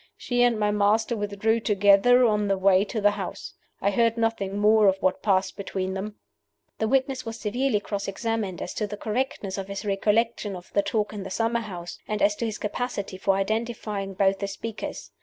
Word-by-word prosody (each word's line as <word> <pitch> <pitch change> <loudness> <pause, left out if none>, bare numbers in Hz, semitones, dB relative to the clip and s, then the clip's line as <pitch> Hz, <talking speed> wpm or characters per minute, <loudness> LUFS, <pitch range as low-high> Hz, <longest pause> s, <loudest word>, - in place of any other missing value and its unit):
She 245 -1 -1
and 240 -3 +3
my 210 0 +2
master 210 +3 +2
withdrew 210 +2 0
together 210 +4 +5
on 210 -2 +2
the 195 -1 +1
way 190 0 +4
to 220 - -3
the 205 0 +4
house. 200 -3 -6 0.3
I 200 - +2
heard 230 +2 +2
nothing 225 -4 -1
more 210 0 +5
of 190 0 +4
what 185 -1 0
passed 190 -2 +1
between 190 -1 -3
them." 205 +2 -5 0.6
This 220 - +1
witness 265 0 +1
was 225 -1 -6
severely 240 +1 0
cross 200 -1 -4
examined 205 -2 -2
as - - -6
to 210 - -2
the 205 - -6
correctness 210 -4 -2
of 195 - -5
his 200 +2 -6
recollection 210 +1 0
of 180 0 -12
the 200 - +4
talk 210 +1 -1
in 205 - -5
the 190 - -6
summer 230 +4 0
house, 175 -5 -7
and 210 -1 -2
as 205 0 +4
to 235 - -1
his 215 - -4
capacity 205 -3 -4
for 195 0 +2
identifying 210 -1 -2
both 195 0 +2
the 200 - -2
speakers. 215 +3 -6
210 Hz, 200 wpm, -25 LUFS, 195-225 Hz, 0.6 s, together